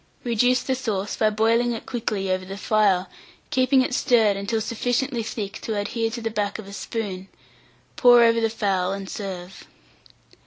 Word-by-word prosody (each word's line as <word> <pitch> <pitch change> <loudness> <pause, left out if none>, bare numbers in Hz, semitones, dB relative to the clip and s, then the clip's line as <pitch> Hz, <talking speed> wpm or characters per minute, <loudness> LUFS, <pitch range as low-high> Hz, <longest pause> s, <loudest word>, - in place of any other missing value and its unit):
Reduce 245 +2 +2
the 265 - 0
sauce 210 -6 -2
by 215 - +2
boiling 230 +3 +2
it 225 - -7
quickly 215 -6 -2
over 185 0 -1
the 195 +1 -7
fire, 200 -4 +2 0.5
keeping 260 +1 +3
it 255 - -3
stirred 225 -5 +3
until 200 +3 -2
sufficiently 245 +3 -1
thick 215 -1 -5
to 220 -2 -3
adhere 225 +3 -1
to 235 +1 -6
the 225 0 -3
back 205 -2 -2
of 215 -3 -9
a 200 - -10
spoon; 200 -3 -5 0.7
pour 245 -1 +7
over 230 0 +4
the 225 - +2
fowl, 195 -4 0
and 195 -1 -6
serve. 190 -2 -7
220 Hz, 170 wpm, -24 LUFS, 200-235 Hz, 0.7 s, pour